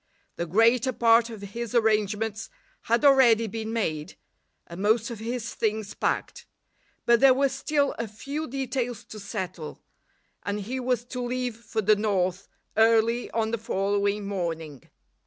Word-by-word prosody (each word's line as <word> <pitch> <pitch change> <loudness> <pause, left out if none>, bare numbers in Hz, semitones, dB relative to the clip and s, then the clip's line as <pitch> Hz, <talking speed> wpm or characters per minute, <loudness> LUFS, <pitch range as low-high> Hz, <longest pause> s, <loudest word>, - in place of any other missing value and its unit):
The 170 - -3
greater 230 +7 +3
part 230 0 +4
of 220 -3 -9
his 235 +4 -5
arrangements 215 -1 +1 0.4
had 235 +5 +2
already 250 -5 +6
been 220 +1 -4
made, 165 -8 -2 0.5
and 170 +2 -8
most 220 +3 +2
of 230 - -7
his 235 +1 -4
things 215 -1 -2
packed; - - -2 0.6
but 235 0 +5
there 265 0 +6
were 275 +1 +2
still 280 +1 0
a 235 - -2
few 280 +9 -5
details 250 -3 -3
to 215 - -10
settle, 190 -6 -6 0.6
and 205 +1 -3
he 250 +6 -4
was 250 -2 -1
to 250 0 -5
leave 250 -1 -2
for 225 -1 -4
the 215 +2 +5
north 195 -3 -1 0.3
early 230 +2 +3
on 220 -1 -1
the 230 - -1
following 205 -1 0
morning. 165 -7 -4
225 Hz, 150 wpm, -26 LUFS, 205-240 Hz, 0.6 s, already